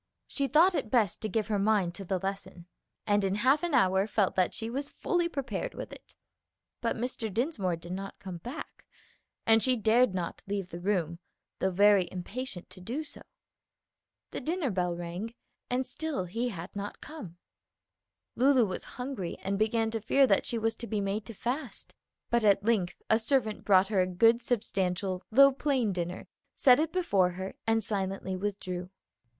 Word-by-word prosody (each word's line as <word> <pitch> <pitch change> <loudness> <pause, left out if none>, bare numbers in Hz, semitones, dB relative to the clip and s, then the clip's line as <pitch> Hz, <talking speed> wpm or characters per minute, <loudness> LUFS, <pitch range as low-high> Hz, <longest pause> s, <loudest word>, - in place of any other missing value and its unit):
She 280 -1 -1
thought 330 +7 +5
it 240 - -2
best 215 -7 +2
to 215 - -2
give 220 -1 0
her 210 -1 0
mind 200 -4 +2
to 195 - -7
the 190 0 -1
lesson, 190 -2 -5 0.4
and 205 -1 +2
in 195 0 +1
half 260 +8 +3
an 345 -5 0
hour 190 +1 +3
felt 205 -3 +1
that 185 -1 +2
she 225 - -4
was 275 +5 -3
fully 345 -1 0
prepared 280 - -4
with - - -7
it. - - -14 0.7
But - - 0
Mr. 235 -2 -3
Dinsmore 220 - 0
did 170 +1 -10
not 195 +1 -5
come 185 -3 -7
back, 250 - -9 0.6
and 225 0 +5
she 255 +2 +3
dared 225 -1 +3
not 175 -2 -3
leave 200 -2 -3
the 170 - -7
room, 175 -3 -1 0.4
though 190 - +2
very 195 -1 +4
impatient 190 +1 -5
to 185 0 -12
do 245 +12 -3
so. 305 - -11 1.1
The - - -4
dinner 320 -5 -1
bell 180 -2 0
rang, 175 +7 -5 0.3
and 255 +1 0
still 310 - -3
he 230 +7 -2
had 180 -3 -8
not 205 +1 -5
come. 200 - -9 1.0
Lulu 260 -2 +5
was 185 -3 -4
hungry 250 -9 -4
and 195 +1 -1
began 225 +1 +1
to 225 -1 -3
fear 275 +6 +4
that 200 -6 +2
she 235 - -1
was 225 0 0
to 235 - -6
be 215 -2 -1
made 200 +2 -2
to 230 - -8
fast; 245 +1 -4 0.4
but 235 -1 +3
at 200 -1 +4
length 210 -6 0
a 220 - +5
servant 225 -2 0
brought 190 -1 +5
her 200 -4 +3
a 180 - +1
good, 225 +6 +4
substantial, 190 -5 -1
though 275 +4 +8
plain 265 -6 0
dinner, 175 0 -4 0.3
set 255 -1 +6
it 315 +1 0
before 200 - +2
her, 190 +1 -5
and 225 0 +2
silently 195 -2 -2
withdrew. 185 -2 -3
210 Hz, 180 wpm, -30 LUFS, 185-245 Hz, 1.1 s, though